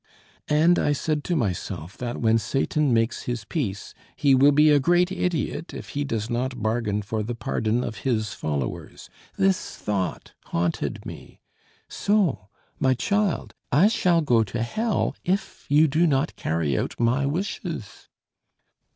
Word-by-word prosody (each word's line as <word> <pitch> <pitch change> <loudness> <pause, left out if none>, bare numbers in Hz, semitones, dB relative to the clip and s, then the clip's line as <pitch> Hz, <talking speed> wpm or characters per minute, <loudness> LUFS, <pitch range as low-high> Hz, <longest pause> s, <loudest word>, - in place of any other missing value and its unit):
"And 160 +4 +4
I 145 - +2
said 150 +1 -1
to 175 - 0
myself 95 - -3
that 120 -1 -3
when 115 -1 +3
Satan 140 +4 0
makes 115 0 +1
his 120 -3 -3
peace 105 - -3 0.2
he 140 -2 +3
will 135 +2 +6
be 150 +1 +5
a 145 - +5
great 175 +5 +3
idiot 175 -3 -2
if - - -8
he 145 - -2
does 115 -6 -2
not 125 +2 -2
bargain 110 -1 -1
for 110 +2 -2
the 115 +3 -3
pardon 115 +1 -1
of 110 - -5
his 110 -5 -1
followers. 70 -8 -4 0.3
This 195 -1 +1
thought 100 -3 -3
haunted 85 0 -2
me. - - -10 0.5
So, 195 - +1 0.3
my 130 -1 +3
child, 200 - 0 0.2
I 180 +9 +5
shall 180 -6 +2
go 120 -7 +3
to 115 +3 -3
hell 220 - -1
if 190 +3 -2
you 150 +3 +5
do 160 +4 +2
not 140 0 +1
carry 80 -4 -1
out - - -3
my 125 +4 +2
wishes." 165 - -4
130 Hz, 150 wpm, -25 LUFS, 110-160 Hz, 0.5 s, will